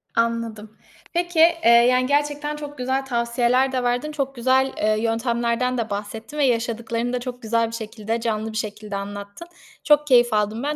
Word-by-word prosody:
Anladım. 230 -2 -2 0.4
Peki, 345 -1 -1
eee, 330 -6 +5 0.2
yani, 255 0 +3
gerçekten 295 +1 0
çok 290 -1 -8
güzel 260 +2 -1
tavsiyeler 245 +1 +1
de 255 -1 -1
verdin, 245 +5 -1
çok 275 -2 -3
güzel, 260 +2 +2
eee, 215 0 +1
yöntemlerden 235 +2 0
de 225 -2 -2
bahsettin 220 +7 -6
ve 285 - +3
yaşadıklarını 235 0 -1
da 250 - 0
çok 250 0 -7
güzel 230 0 +1
bir 230 - -6
şekilde, 225 0 -4
canlı 220 -1 -2
bir 220 - -5
şekilde 210 -1 -5
anlattın. 200 +9 -7 0.4
Çok 295 0 +4
keyif 240 -3 +5
aldım 215 +3 0
ben, 295 +1 -1
240 Hz, 175 wpm, -22 LUFS, 225-265 Hz, 0.4 s, eee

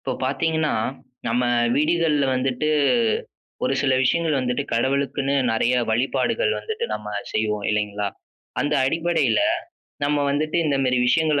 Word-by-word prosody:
இப்போ 130 - -3
பார்த்தீங்கன்னா, 160 +3 0 0.5
நம்ம 120 +2 +1 0.3
வீடுகள்ல 155 -1 +2
வந்துட்டு, 130 +3 -1 1.0
ஒரு 130 - +1
சில 135 -1 +2
விஷயங்கள் 160 +1 +1
வந்துட்டு 125 +2 -1
கடவுளுக்குன்னு 140 +3 0 0.2
நெறைய 120 +3 +2
வழிபாடுகள் 135 - +1
வந்துட்டு 445 +1 -4
நம்ம 105 - -7 0.3
செய்வோம், 105 -1 -1
இல்லைங்களா? 105 -1 -1 0.5
அந்த 150 0 0
அடிப்படைல, 165 - +1 0.6
நம்ம 145 +1 +1
வந்துட்டு 155 +3 -1
இந்தமாரி 135 -4 +1
விஷயங்கள் 155 +3 +2
140 Hz, 115 wpm, -23 LUFS, 125-155 Hz, 1.0 s, வீடுகள்ல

